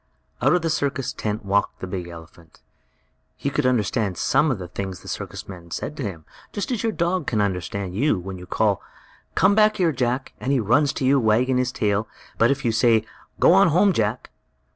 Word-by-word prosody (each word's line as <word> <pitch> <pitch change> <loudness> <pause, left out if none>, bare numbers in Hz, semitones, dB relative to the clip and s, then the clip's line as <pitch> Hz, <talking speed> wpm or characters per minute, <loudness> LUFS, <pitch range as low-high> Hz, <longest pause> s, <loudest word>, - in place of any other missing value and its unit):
Out - - +4
of 180 - 0
the 165 - 0
circus 140 -3 -1
tent 105 0 -4
walked 100 +1 0
the - - -5
big 90 -2 -5
elephant. 85 -1 -14 0.7
He - - -3
could - - +1
understand 110 -5 0
some 150 +4 +2
of 130 - 0
the 90 -2 -7
things 95 +1 -6
the - - -14
circus - - -6
men 90 -3 -10
said 145 - -5
to - - -5
him, 85 -7 -6 0.3
just 205 +6 -4
as 240 - -1
your 225 - 0
dog 175 -4 -1
can 110 - 0
understand 95 -1 -2
you, 130 +4 +2
when 95 +1 -7
you 90 - -11
call: - - +1 0.5
"Come 200 - +4 0.2
here, 180 -5 +2
Jack!" 130 -1 -2
Then 130 - -4
he 140 -2 +3
runs 130 +7 +3
to 135 - -2
you, 135 +1 +4
wagging 125 +3 +2
his 125 0 0
tail. 105 -2 0 0.3
But 115 - +5
if 135 -1 -1
you 115 - +3
say: 115 -1 +3 0.3
"Go - - +6
on 195 0 +6
home, 185 +5 +4
Jack!" 110 -2 -1
115 Hz, 205 wpm, -23 LUFS, 95-140 Hz, 0.7 s, Go